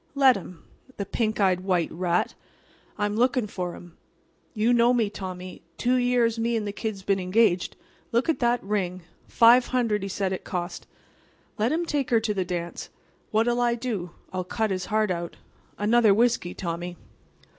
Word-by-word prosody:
Let 270 -2 +6
him. 180 -3 -9 0.3
The 200 - -3
pink 220 +1 -1
eyed 185 -3 +3
white 180 -3 0
rat! 175 0 0 0.6
I'm 205 0 -1
lookin' 250 +1 +2
for 180 -4 -4
'm. 175 -1 -14 0.6
You 225 +3 +3
know 240 +1 +4
me, 220 -4 +1
Tommy. 185 -2 -7 0.2
Two 250 +1 +1
years 245 -2 +2
me 230 +1 0
and 215 - -2
the - - -2
Kid's 205 -2 -5
been 195 0 +1
engaged. 185 -1 +2 0.4
Look 235 +2 +1
at 325 - +1
that 240 0 +1
ring. 185 -3 -2 0.2
Five 240 +2 +6
hundred, 230 -5 0
he 195 - -4
said 190 0 -1
it 185 - -5
cost. 175 0 -5 0.7
Let 225 +4 +2
him 335 +2 0
take 290 -5 -1
her 230 - +4
to 220 -1 -1
the 190 -2 0
dance. 175 -1 -5 0.4
What'll 240 +3 +2
I 240 -1 +2
do? 225 -7 -3 0.2
I'll 185 -1 -2
cut 220 +3 -1
his 185 -1 -2
heart 215 -2 +1
out. 170 -1 -4 0.4
Another 215 0 +4
whiskey, 230 -6 +1
Tommy." 175 0 -4
210 Hz, 175 wpm, -26 LUFS, 185-235 Hz, 0.7 s, Let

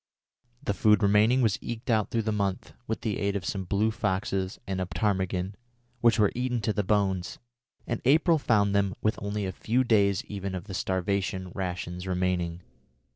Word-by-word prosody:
The 130 - 0
food 105 +1 +4
remaining 105 +6 +4
was 105 -5 +2
eked 120 +2 -4
out 110 -2 +2
through 115 -2 0
the 110 - 0
month 100 +2 -2
with 110 - -2
the 110 -4 -2
aid 100 0 0
of 95 -3 -3
some 95 +1 -3
blue 100 +4 +1
foxes 95 -2 -1
and 95 -1 -2
a 90 - -2
ptarmigan, 95 +1 -1 0.5
which 115 -1 +4
were 105 -2 +4
eaten 125 0 -1
to 110 0 0
the 105 - +1
bones, 95 -3 0 0.5
and 115 - -3
April 160 +5 +4
found 105 -6 +2
them 100 -1 +1
with 110 - +1
only 100 0 -2
a 95 - -2
few 120 +7 0
days 100 -5 +2
even 100 -2 -5
of 90 - -4
the 100 -1 -8
starvation 95 0 -1
rations 90 -1 -4
remaining. 90 -2 -1
100 Hz, 180 wpm, -28 LUFS, 95-110 Hz, 0.5 s, food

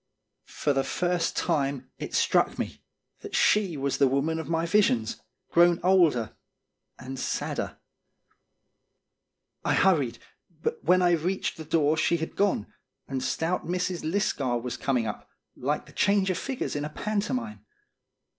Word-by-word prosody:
For 145 - -1
the 135 0 +1
first 175 +4 0
time 135 -3 -1
it - - -5
struck - - +2
me - - -4 0.4
that - - -7
she 195 -7 +3
was 140 0 -1
the 140 - +6
woman 140 +5 0
of 160 - -6
my 165 0 +1
visions, 165 - +2 0.3
grown 175 0 +5
older 170 - +3 0.6
and 130 +1 -7
sadder. - - -3 1.9
I - - +2
hurried, 145 -11 +3 0.5
but - - -2
when 180 +2 +4
I 175 - +4
reached 175 +3 0
the 160 - -7
door 155 0 +2
she 170 +2 +2
had 160 0 -5
gone, 200 - +1 0.4
and 135 -1 -3
stout 160 +8 -1
Mrs. 180 0 -1
Lisgar 155 - 0
was 125 +1 -4
coming 125 -4 0
up, 105 - -6 0.3
like - - -2
the - - -15
change 200 -1 +2
of 180 - -2
figures 265 - -3
in 145 - -2
a 150 - -3
pantomime. 215 +6 -3
160 Hz, 145 wpm, -27 LUFS, 135-185 Hz, 1.9 s, the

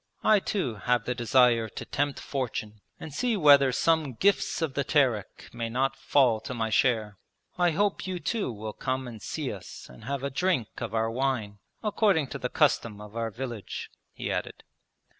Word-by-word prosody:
I 215 -1 +6
too 160 - -2
have 120 +2 +1
the 125 - 0
desire 120 -1 +3
to - - -7
tempt 145 0 -1
fortune 110 -6 -4 0.2
and 155 - -8
see 235 - 0
whether 140 -5 +7
some 155 0 +2
Gifts 195 - +2
of 160 -4 -1
the 140 - 0
Terek 130 -8 0
may 115 -1 -3
not 130 +3 0
fall 125 -6 +3
to 120 +3 -6
my 110 -1 -1
share. 110 -4 +1 0.4
I 175 -1 +3
hope 200 +4 0
you 185 -1 -3
too 210 - -1
will 110 -1 -6
come 130 -1 -2
and 115 -3 -9
see - - -3
us - - -10
and 65 - -13
have 140 +1 -3
a 140 - -2
drink 145 - +1
of 110 - -3
our 115 0 +1
wine, 115 -5 -1 0.2
according 200 - +2
to - - -5
the - - -2
custom 105 -3 +1
of 105 +1 -11
our 115 -1 -1
village,' 120 -2 -6 0.2
he - - -4
added. - - -4
130 Hz, 185 wpm, -28 LUFS, 115-145 Hz, 0.4 s, whether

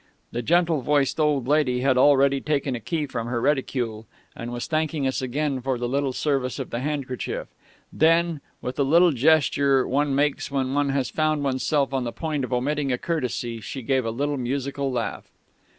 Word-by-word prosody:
The 120 - -2
gentle 170 +1 +2
voiced 145 +2 +1
old 145 -5 +1
lady 140 -4 +2
had 135 0 +3
already 140 0 +4
taken 145 -3 -1
a - - -4
key 155 +6 -2
from 120 -4 -4
her 120 0 -1
reticule 120 -5 -1 0.3
and 120 +1 -6
was 120 0 -4
thanking 155 -2 -1
us 130 0 0
again 135 +1 -1
for 130 0 -1
the 120 0 -2
little 140 +1 0
service 135 -1 -1
of 135 - -5
the 120 - -2
handkerchief; 135 -2 -3 0.4
then, 165 -1 +3 0.2
with 125 - -4
the 140 - +3
little 170 +5 +5
gesture 140 -1 +3
one 140 +1 +1
makes 145 +1 0
when 135 -1 -1
one 145 0 +1
has 135 -2 -1
found 155 -2 0
oneself 135 +1 0
on 135 -2 0
the 120 - -3
point 155 0 -3
of 130 - -4
omitting 140 +3 0
a 125 - +1
courtesy, 125 -7 -3
she 130 +5 -6
gave 130 +2 +1
a 115 - -2
little 145 +5 -1
musical 135 +2 -2
laugh. 120 -2 -3
135 Hz, 190 wpm, -24 LUFS, 125-150 Hz, 0.4 s, little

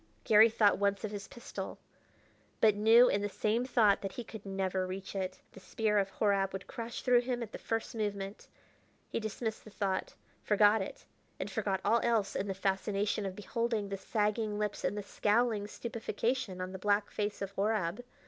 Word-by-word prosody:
Garry 220 +1 +7
thought 210 -3 +3
once 200 0 +1
of 215 - -3
his 205 -1 -6
pistol, 240 - -7 0.8
but 215 -1 +6
knew 225 +4 +6
in 200 - +1
the 205 - -1
same 220 +4 0
thought 220 -5 +4
that 195 - -4
he 245 - -5
could 220 -2 -10
never 190 -1 -1
reach 190 +2 -6
it; 190 -1 -3
the - - -12
spear 210 +1 0
of 195 -1 0
Horab 195 -2 +1
would 190 - -5
crash 235 -1 -6
through 250 -1 +5
him 245 -1 -2
at 220 - -8
the - - -7
first 225 0 -2
movement. 205 -2 -4 0.6
He - - -1
dismissed 220 0 -4
the - - -12
thought 200 -2 -2 0.3
forgot 210 0 +4
it 190 - -7 0.3
and - - -4
forgot 195 -2 -1
all 225 +3 +4
else 225 -4 +1
in 200 - -1
the 195 - -2
fascination 200 +1 0
of 185 - -6
beholding 220 0 -2
the 200 - -2
sagging 210 +1 -1
lips 210 -1 -2
and 205 - 0
the 205 - -3
scowling 210 +1 +1
stupefaction 230 -2 -3
on 185 0 -4
the 190 - -7
black 205 +1 +1
face 205 0 -2
of 195 -1 -4
Horab. 200 0 -1
210 Hz, 190 wpm, -32 LUFS, 195-225 Hz, 0.8 s, Garry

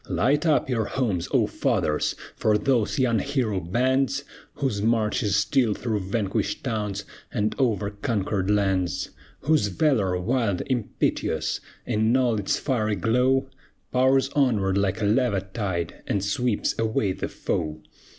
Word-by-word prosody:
Light 145 +7 +2
up 150 -3 +3
your 115 -4 0
homes, 100 -7 -1
O - - +3
fathers! 75 0 0 0.2
For 105 -1 +2
those 125 -1 +1
young 120 -4 +2
hero 125 -8 0
bands, 130 +9 +1 0.3
Whose 120 -8 -1
march 110 -1 +1
is 100 -2 +1
still 105 +2 +2
through 110 -4 -2
vanquished 105 -1 -1
towns, 105 -5 -2 0.3
And 105 -1 0
over 105 -6 +1
conquered 100 -2 -1
lands! 95 -4 +1 0.3
Whose 150 -7 +2
valor, 100 - +1
wild, 110 -1 0
impetuous, 125 -5 -1 0.3
In 110 +4 +2
all 120 -4 +2
its 100 - 0
fiery 110 -6 0
glow, 125 +6 +2 0.4
Pours 130 +1 +3
onward 110 -10 +2
like 100 +1 0
a - - +2
lava 105 -2 +2
tide, 95 -4 -4
And 100 -1 0
sweeps 115 +2 0
away 110 -3 +1
the - - -3
foe! 75 0 -3
110 Hz, 140 wpm, -25 LUFS, 100-130 Hz, 0.4 s, up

